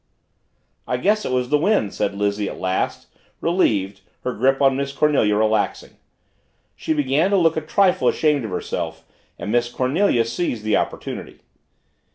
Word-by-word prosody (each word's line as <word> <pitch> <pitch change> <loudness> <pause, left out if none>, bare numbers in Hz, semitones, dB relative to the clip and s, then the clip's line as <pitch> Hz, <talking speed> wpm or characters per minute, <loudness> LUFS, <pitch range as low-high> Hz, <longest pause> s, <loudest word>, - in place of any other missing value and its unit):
"I 125 - 0
guess 210 +10 +1
it - - -2
was 125 -1 0
the 150 - +3
wind," 170 - +1
said 100 - -2
Lizzie 100 0 -1
at - - -8
last, 95 0 -2 0.3
relieved, 105 - 0 0.2
her 125 - -2
grip 135 +5 +2
on 135 -1 +4
Miss 140 0 -2
Cornelia 140 -7 +2
relaxing. 110 0 0 0.8
She - - -4
began 150 +3 +2
to 200 - +3
look 165 -3 +3
a 160 - -1
trifle 185 +3 +2
ashamed 150 -4 +2
of 110 - -4
herself 90 - -4 0.3
and 105 - -5
Miss 120 +1 +1
Cornelia 130 - +1
seized 120 -2 -3
the 110 -1 +1
opportunity. - - -4
130 Hz, 160 wpm, -21 LUFS, 110-160 Hz, 0.8 s, on